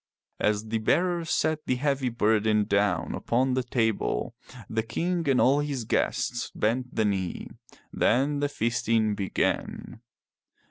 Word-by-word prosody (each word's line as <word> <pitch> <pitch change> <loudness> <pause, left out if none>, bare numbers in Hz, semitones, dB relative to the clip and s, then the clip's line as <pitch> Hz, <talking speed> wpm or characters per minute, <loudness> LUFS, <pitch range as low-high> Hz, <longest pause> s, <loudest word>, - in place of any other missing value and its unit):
As 105 +1 0
the 110 0 0
bearer 175 +9 +1
set 155 -1 0
the 130 - +2
heavy 135 -1 0
burden 110 -2 +2
down 100 0 0
upon 130 +2 0
the 130 - +1
table, 115 - -1 0.3
the 110 - -1
King 165 +8 -2
and 130 - +3
all 140 +3 +4
his 145 -4 -2
guests 120 +2 -1
bent 125 +4 -1
the 110 - +2
knee. 95 -4 -2 0.4
Then 140 +5 +2
the 145 0 0
feasting 115 -3 +1
began. 100 +2 -2
120 Hz, 135 wpm, -27 LUFS, 110-140 Hz, 0.4 s, all